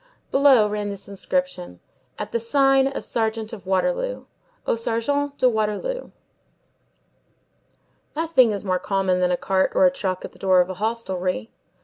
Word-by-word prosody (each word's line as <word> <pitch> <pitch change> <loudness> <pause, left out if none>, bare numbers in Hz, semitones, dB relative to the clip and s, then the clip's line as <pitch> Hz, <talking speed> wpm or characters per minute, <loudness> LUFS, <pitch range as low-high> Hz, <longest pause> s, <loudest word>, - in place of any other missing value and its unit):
Below 270 -6 +5
ran 210 0 -3
this 200 -1 -8
inscription: 180 - -3 0.4
AT - - -5
THE 235 - 0
SIGN 270 +3 +3
OF 275 - -5
SERGEANT 220 -1 -1
OF 195 -5 -10
WATERLOO - - 0 0.4
(Au - - +1
Sargent 280 +6 -1
de 255 - +4
Waterloo). 220 - -1 2.1
Nothing 315 -6 +4
is 205 -1 -3
more 185 -1 +1
common 190 -2 0
than 180 0 +2
a 180 - +1
cart 190 +1 +1
or 285 - +5
a 275 - +5
truck 190 -9 -3
at - - -9
the - - -20
door 185 -1 +4
of 180 +1 +2
a 185 +2 -9
hostelry. 185 - -2
215 Hz, 155 wpm, -23 LUFS, 190-270 Hz, 2.1 s, Below